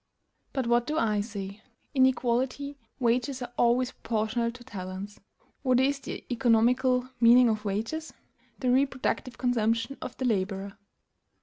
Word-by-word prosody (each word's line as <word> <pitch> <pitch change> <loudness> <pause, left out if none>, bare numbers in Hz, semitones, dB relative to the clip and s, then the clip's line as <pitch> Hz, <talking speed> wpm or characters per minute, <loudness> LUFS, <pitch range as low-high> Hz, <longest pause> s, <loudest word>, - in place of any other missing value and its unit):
But, 265 -3 -1
what 240 +1 +2
do 310 - -1
I 215 -6 +2
say? 200 -1 -6 0.3
In 260 -2 +6
equality 260 +3 -1 0.2
wages 250 +2 +1
are 245 0 -8
always 245 +2 +2
proportional 225 0 -1
to 245 +1 -13
talents. 195 -2 -7 0.4
What 255 -2 +3
is 275 +1 +2
the - - -7
economical 250 +2 +3
meaning 240 +1 +7
of 215 -1 -1
wages? 225 +11 -3 0.5
The 250 -2 +1
reproductive 260 -2 0
consumption 230 +1 0
of - - -7
the 260 - -2
laborer. 195 -3 -1
240 Hz, 135 wpm, -28 LUFS, 220-255 Hz, 0.5 s, meaning